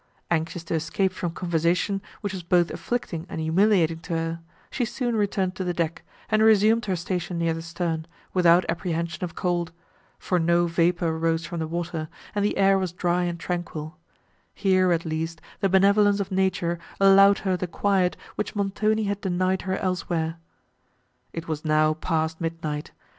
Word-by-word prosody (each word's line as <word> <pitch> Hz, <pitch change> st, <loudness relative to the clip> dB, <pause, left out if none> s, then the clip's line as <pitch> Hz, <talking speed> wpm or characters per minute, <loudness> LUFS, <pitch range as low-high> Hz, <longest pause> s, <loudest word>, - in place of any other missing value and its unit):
Anxious 165 Hz, +1 st, -1 dB
to 170 Hz, -, -4 dB
escape 165 Hz, +4 st, 0 dB
from 180 Hz, -1 st, -3 dB
conversation, 175 Hz, +3 st, 0 dB, 0.2 s
which 205 Hz, -2 st, -3 dB
was 185 Hz, -, -4 dB
both 175 Hz, 0 st, +2 dB
afflicting 180 Hz, -8 st, -3 dB
and 165 Hz, -, -5 dB
humiliating 165 Hz, 0 st, +3 dB
to 170 Hz, +1 st, -6 dB
her, 165 Hz, 0 st, -2 dB, 0.3 s
she 250 Hz, -, -1 dB
soon 240 Hz, 0 st, -2 dB
returned 195 Hz, -3 st, 0 dB
to 190 Hz, -, -2 dB
the 180 Hz, -1 st, -2 dB
deck, 165 Hz, -1 st, -1 dB, 0.3 s
and 215 Hz, 0 st, +2 dB
resumed 220 Hz, +1 st, +5 dB
her 190 Hz, -, +1 dB
station 175 Hz, 0 st, -3 dB
near 165 Hz, -1 st, +1 dB
the 165 Hz, -, -5 dB
stern, 165 Hz, -1 st, -3 dB, 0.3 s
without 175 Hz, -1 st, +5 dB
apprehension 170 Hz, +1 st, -2 dB
of 175 Hz, -, -4 dB
cold, 175 Hz, -2 st, -1 dB, 0.5 s
for 180 Hz, -, 0 dB
no 170 Hz, +1 st, +3 dB
vapour 170 Hz, -1 st, +1 dB
rose 165 Hz, 0 st, 0 dB
from 170 Hz, +1 st, -5 dB
the 160 Hz, -, -2 dB
water, 165 Hz, -1 st, -3 dB, 0.2 s
and 205 Hz, -, 0 dB
the 205 Hz, -, 0 dB
air 195 Hz, 0 st, +4 dB
was 185 Hz, -3 st, -2 dB
dry 175 Hz, 0 st, 0 dB
and 170 Hz, -1 st, -3 dB
tranquil; 165 Hz, -2 st, -4 dB, 0.6 s
here, 185 Hz, -2 st, +3 dB
at 170 Hz, 0 st, +1 dB
least, 165 Hz, +1 st, -3 dB, 0.2 s
the 195 Hz, -, +1 dB
benevolence 200 Hz, +2 st, +4 dB
of 195 Hz, 0 st, -3 dB
nature 185 Hz, -3 st, 0 dB, 0.2 s
allowed 195 Hz, +1 st, +7 dB
her 190 Hz, -2 st, 0 dB
the 180 Hz, 0 st, -3 dB
quiet 185 Hz, +1 st, +1 dB, 0.2 s
which 210 Hz, -, -4 dB
Montoni 210 Hz, +2 st, +1 dB
had 200 Hz, 0 st, -2 dB
denied 185 Hz, 0 st, 0 dB
her 190 Hz, -, 0 dB
elsewhere. 170 Hz, -3 st, -2 dB, 0.9 s
It 165 Hz, 0 st, -6 dB
was 155 Hz, -2 st, -3 dB
now 155 Hz, 0 st, +3 dB
past 160 Hz, 0 st, -2 dB
midnight. 160 Hz, -3 st, -3 dB
175 Hz, 170 wpm, -25 LUFS, 165-195 Hz, 0.9 s, allowed